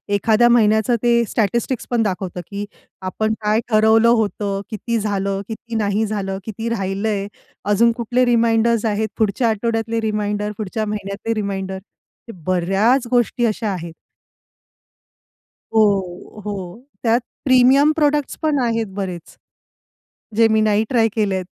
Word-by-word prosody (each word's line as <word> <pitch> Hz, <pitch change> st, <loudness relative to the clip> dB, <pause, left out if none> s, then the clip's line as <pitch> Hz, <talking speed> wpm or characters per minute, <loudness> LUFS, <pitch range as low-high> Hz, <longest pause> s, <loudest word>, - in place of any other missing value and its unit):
एखाद्या 225 Hz, +4 st, +3 dB
महिन्याचं 220 Hz, 0 st, +3 dB
ते 235 Hz, -1 st, +4 dB
स्टॅटिस्टिक्स 235 Hz, +3 st, -1 dB
पण 235 Hz, -2 st, +2 dB
दाखवतं 185 Hz, -3 st, -3 dB
की 200 Hz, 0 st, -5 dB, 0.4 s
आपण 215 Hz, +4 st, -1 dB
काय 215 Hz, +1 st, +2 dB
ठरवलं 220 Hz, +1 st, +5 dB
होत, 220 Hz, -3 st, +1 dB, 0.3 s
किती 230 Hz, +1 st, -2 dB
झालं, 200 Hz, -1 st, -1 dB
किती 230 Hz, +1 st, -7 dB
नाही 215 Hz, 0 st, +1 dB
झालं, 195 Hz, -2 st, -3 dB
किती 225 Hz, +1 st, -4 dB
राहिलंय, 200 Hz, -1 st, -2 dB, 0.4 s
अजून 210 Hz, +3 st, +4 dB
कुठले 245 Hz, +2 st, +1 dB
रिमाइंडर्स 230 Hz, -1 st, +2 dB
आहेत, 215 Hz, 0 st, 0 dB
पुढच्या 220 Hz, +2 st, +1 dB
आठवड्यातले 225 Hz, +1 st, -1 dB
रिमाइंडर, 210 Hz, -1 st, -1 dB
पुढच्या 215 Hz, +1 st, -3 dB
महिन्यातले 210 Hz, +1 st, -3 dB
रिमाइंडर. 195 Hz, -2 st, -3 dB, 0.5 s
हे -, -, -4 dB
बऱ्याच 195 Hz, +8 st, +2 dB
गोष्टी 240 Hz, 0 st, +2 dB
अशा 215 Hz, -1 st, -1 dB
आहेत. 170 Hz, -2 st, -6 dB, 1.8 s
हो, 200 Hz, -2 st, 0 dB
हो. 200 Hz, +3 st, -6 dB, 0.2 s
त्यात 235 Hz, +1 st, +3 dB, 0.2 s
प्रीमियम 265 Hz, +3 st, +5 dB
प्रॉडक्ट्स 295 Hz, -2 st, +1 dB
पण 305 Hz, -3 st, +1 dB
आहेत 230 Hz, -2 st, 0 dB
बरेच, 180 Hz, -4 st, -6 dB, 1.0 s
जे 225 Hz, 0 st, +5 dB
मी 220 Hz, 0 st, +3 dB
नाही 215 Hz, 0 st, +2 dB
ट्राय 230 Hz, -3 st, +3 dB
केलेत. 195 Hz, -4 st, 0 dB
220 Hz, 130 wpm, -20 LUFS, 200-235 Hz, 1.8 s, ठरवलं